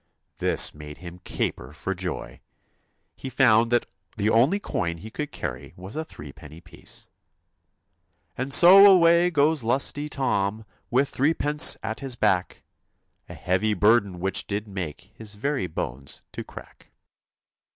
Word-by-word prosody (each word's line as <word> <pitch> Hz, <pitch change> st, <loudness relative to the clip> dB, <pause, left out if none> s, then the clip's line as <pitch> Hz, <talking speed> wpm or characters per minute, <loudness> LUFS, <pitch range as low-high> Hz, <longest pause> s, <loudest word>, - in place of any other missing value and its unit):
This -, -, +1 dB
made 75 Hz, 0 st, -11 dB
him 85 Hz, 0 st, -11 dB
caper -, -, -4 dB
for 95 Hz, -, -4 dB
joy. 90 Hz, -10 st, -6 dB, 0.8 s
He 135 Hz, -, -7 dB
found 120 Hz, -3 st, +3 dB
that 120 Hz, -1 st, +2 dB, 0.3 s
the 105 Hz, +1 st, +1 dB
only 135 Hz, -, +3 dB
coin 85 Hz, -, -3 dB
he 110 Hz, +7 st, -11 dB
could 150 Hz, +3 st, -5 dB
carry -, -, -7 dB
was 95 Hz, +3 st, -10 dB
a 160 Hz, -, -3 dB
threepenny 75 Hz, -, -12 dB
piece. -, -, -10 dB, 1.3 s
And 130 Hz, +2 st, -4 dB
so 195 Hz, +6 st, +9 dB
away 170 Hz, -1 st, +5 dB
goes 150 Hz, -3 st, +1 dB
lusty 140 Hz, +5 st, -1 dB
Tom, 110 Hz, -6 st, -2 dB, 0.2 s
With 135 Hz, +3 st, +1 dB
threepence 150 Hz, +1 st, +3 dB
at 110 Hz, 0 st, -4 dB
his 135 Hz, -3 st, -4 dB
back, 95 Hz, -6 st, -1 dB, 0.7 s
A -, -, -9 dB
heavy 100 Hz, +4 st, -1 dB
burden 105 Hz, -2 st, +2 dB
which 95 Hz, +2 st, -1 dB
did 105 Hz, +1 st, -4 dB
make 95 Hz, -1 st, -7 dB
His 105 Hz, -2 st, -8 dB
very 135 Hz, -1 st, -2 dB
bones 70 Hz, -4 st, -5 dB
to -, -, -7 dB
crack. -, -, -14 dB
110 Hz, 140 wpm, -24 LUFS, 90-140 Hz, 1.3 s, so